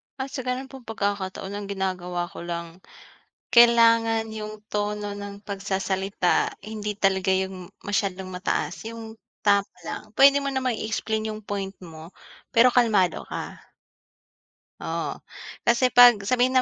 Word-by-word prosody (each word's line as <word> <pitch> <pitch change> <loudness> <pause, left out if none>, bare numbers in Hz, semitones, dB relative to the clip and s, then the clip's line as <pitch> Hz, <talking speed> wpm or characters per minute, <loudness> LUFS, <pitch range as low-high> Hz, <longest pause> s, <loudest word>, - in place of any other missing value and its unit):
Ah, 270 0 -5
sa 270 - -5
ganun 255 +1 -3
pong 265 -4 -12
pagkakataon 200 -3 -3
ang 205 0 -5
ginagawa 180 -2 -3
ko - - -9
lang, 170 0 -6 0.7
kailangan 230 -2 +5
yung 215 -1 -7
tono 210 0 -2
ng 200 0 -8
pagsasalita 195 -1 -1
hindi 210 0 -4
talaga 190 -2 +1
yung 190 -1 -3 0.2
masyadong 195 -2 -2
mataas 180 +3 -3
yung 225 -1 -9 0.2
tama 200 -1 +3
lang. 215 - -7
Pwede 275 +1 +7
mo 280 - -3
namang 260 -4 -1
i-explain 220 0 -2
yung 215 0 -9
point 195 -1 -4
mo, 165 0 -11 0.4
pero 240 +2 +7
kalmado 220 -7 +2
ka. - - -6 1.2
Oo, - - -3 0.5
kasi 240 +2 +4
'pag 245 -2 +8
sabihin 250 +5 +2
na 255 - +5
210 Hz, 135 wpm, -25 LUFS, 190-230 Hz, 1.2 s, pag